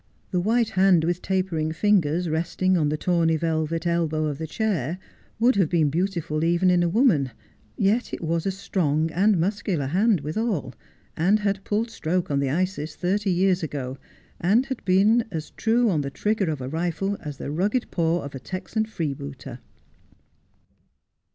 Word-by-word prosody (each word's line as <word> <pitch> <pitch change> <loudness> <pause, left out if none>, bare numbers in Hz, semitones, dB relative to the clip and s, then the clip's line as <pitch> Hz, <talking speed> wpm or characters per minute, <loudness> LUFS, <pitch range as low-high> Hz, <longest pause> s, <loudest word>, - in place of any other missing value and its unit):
The 180 - +1
white 225 +5 +2
hand 185 -3 +4
with 175 +2 -1
tapering 185 -5 -1
fingers 175 -3 +2
resting 175 +4 0
on 155 -4 +2
the 155 - -1
tawny 165 -1 +2
velvet 160 +1 -1
elbow 165 -2 0
of 145 -1 -3
the 160 - -4
chair 175 - -1 0.4
would 235 -1 +4
have 185 -6 +3
been 160 -5 +2
beautiful, 170 -3 -1
even 175 +2 +3
in 180 -1 +3
a 175 - +2
woman; 180 - +3 0.5
yet 215 +4 +1
it - - -5
was 165 +2 -1
a - - +1
strong 165 -5 -1
and 195 +2 +3
muscular 190 -4 -1
hand 190 - +2
withal, 180 - -2 0.4
and 195 +6 +2
had 200 -1 -1
pulled 225 +2 -1
stroke 175 -3 -2
on 140 - +1
the 140 -1 0
Isis 160 0 -2
thirty 195 +3 0
years 185 0 +2
ago, 135 -4 -4 0.4
and 215 +9 +3
had 265 -1 -5
been 205 +6 +4
as 160 -5 -5
true 235 +2 +2
on 155 -4 +1
the 140 - -3
trigger 205 +4 -1
of 150 -4 -3
a 125 - -4
rifle 175 +6 -2
as 145 -2 -7
the - - -5
rugged 205 - -1
paw 170 0 0
of 140 - -7
a 135 - -6
Texan 185 - -3
freebooter. 140 - -5
175 Hz, 170 wpm, -24 LUFS, 155-200 Hz, 0.5 s, hand